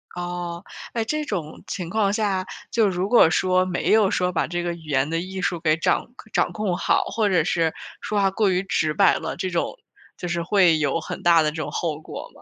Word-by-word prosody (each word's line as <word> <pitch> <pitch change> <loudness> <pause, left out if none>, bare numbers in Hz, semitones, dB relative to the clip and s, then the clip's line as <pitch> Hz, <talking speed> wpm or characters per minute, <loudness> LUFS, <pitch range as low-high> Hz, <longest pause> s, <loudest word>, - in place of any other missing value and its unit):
哦， 175 0 -5 0.3
诶， 230 - 0
这 305 +4 -1
种 170 - -5
情 175 -3 -4
况 200 0 +1
下， 200 -3 0 0.3
就 225 -3 +3
如 185 0 -1
果 235 -8 +6
说 185 +2 +2
没 180 -1 -1
有 215 -3 +5
说 180 -1 0
把 175 - 0
这 175 0 -3
个 175 0 -2
语 165 -1 -11
言 135 +1 +1
的 165 - -1
艺 190 +2 -5
术 175 -1 -1
给 155 -2 +2
掌 165 - +1 0.3
掌 - - +2
控 210 -4 -1
好， - - +2
或 220 -2 0
者 180 -4 +3
是 165 0 +1 0.3
说 210 - -1
话 195 -1 +3
过 200 0 +2
于 185 0 +1
直 160 -5 0
白 195 +2 +4
了， - - -4
这 185 - -3
种 175 - -2 0.4
就 180 - -5
是 170 -1 -1
会 180 -3 +4
有 150 +2 +1
很 - - -6
大 170 -1 +5
的 155 -1 +1
这 - - -12
种 150 - -4
后 155 -3 -2
果 - - -8
吗？ - - -18
180 Hz, 245 characters per minute, -23 LUFS, 165-195 Hz, 0.4 s, 果